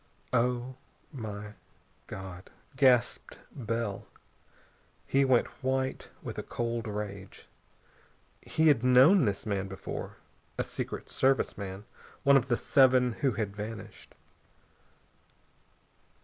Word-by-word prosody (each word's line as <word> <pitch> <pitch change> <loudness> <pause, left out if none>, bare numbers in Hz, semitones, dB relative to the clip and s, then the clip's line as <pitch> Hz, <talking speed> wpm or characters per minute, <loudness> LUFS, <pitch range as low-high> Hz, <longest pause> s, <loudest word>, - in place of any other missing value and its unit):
"Oh, 125 +1 0 0.3
my 105 -6 -7 0.5
God!" 95 -1 -8 0.3
gasped 130 -3 +3
Bell. 115 -4 -3 1.0
He 135 +1 +3
went 130 -3 +4 0.2
white 130 0 -1
with - - -5
a - - -1
cold 115 -1 -3
rage. 105 -2 -6 0.9
He'd 150 -7 +3
known 130 +8 +6
this 100 0 -1
man 100 -2 -1
before. 95 0 -6 0.4
A - - +1
Secret - - -5
Service 135 0 +1
man 100 0 -7 0.4
one 140 0 +6
of 135 -2 +3
the 120 -3 +1
seven 130 -2 +4
who 135 -4 +2
had 100 -1 -3
vanished. 105 +1 -8
120 Hz, 105 wpm, -30 LUFS, 105-130 Hz, 1.0 s, known